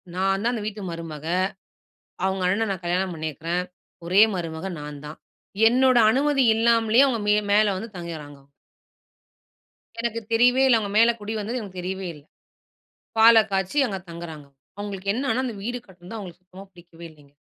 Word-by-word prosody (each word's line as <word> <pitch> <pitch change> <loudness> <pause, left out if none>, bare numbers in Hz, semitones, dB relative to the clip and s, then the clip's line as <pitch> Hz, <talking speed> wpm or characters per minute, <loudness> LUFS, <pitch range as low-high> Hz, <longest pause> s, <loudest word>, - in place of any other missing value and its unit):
நான் 195 +1 +1
தான் 235 - +2
அந்த 225 -4 -4
வீட்டு 215 0 -5
மருமக. 165 -3 -7 1.0
அவங்க 190 -1 -1
அண்ணன 210 +5 +1
நான் 190 -2 -5
கல்யாணம் 180 +1 -1
பண்ணியிருக்கிறேன். 160 +2 -3 0.4
ஒரே 185 +5 +5
மருமக 165 0 -4
நான் 145 -1 -8
தான். 150 - -9 0.5
என்னோட 255 +1 +4
அனுமதி 275 +3 +2
இல்லாமலே 230 +1 +4
அவங்க 240 -5 -1
மே 210 - +4 0.2
மேல 205 -1 +4
வந்து 220 +5 -6
தங்கிறாங்க, 160 -4 -7
அவுங்க. 140 - -29 1.5
எனக்கு 230 -1 -2
தெரியவே 245 +3 +4
இல்ல. 245 -3 +5
அவங்க 205 -2 -4
மேல 230 +1 +6
குடி 210 +1 -5
வந்தது 235 +5 -3
எனக்கு 195 -4 -9
தெரியவே 190 +1 -4
இல்ல. 150 - -15 1.0
பாலை 225 0 +8
காய்ச்சி 195 +8 0
அங்க 195 -4 -4
தங்குறாங்க. 165 -4 -9 0.3
அவங்களுக்கு 200 -1 -3
என்னன்னா, 260 +1 -1
அந்த 240 -4 -4
வீடு 245 +3 -3
கட்டுனது 185 +3 -11
அவங்களுக்கு 180 -4 -9
சுத்தமா 185 +2 -13
புடிக்கவே 170 -2 -14
இல்லைங்க. 145 -2 -22
195 Hz, 160 wpm, -24 LUFS, 170-225 Hz, 1.5 s, பாலை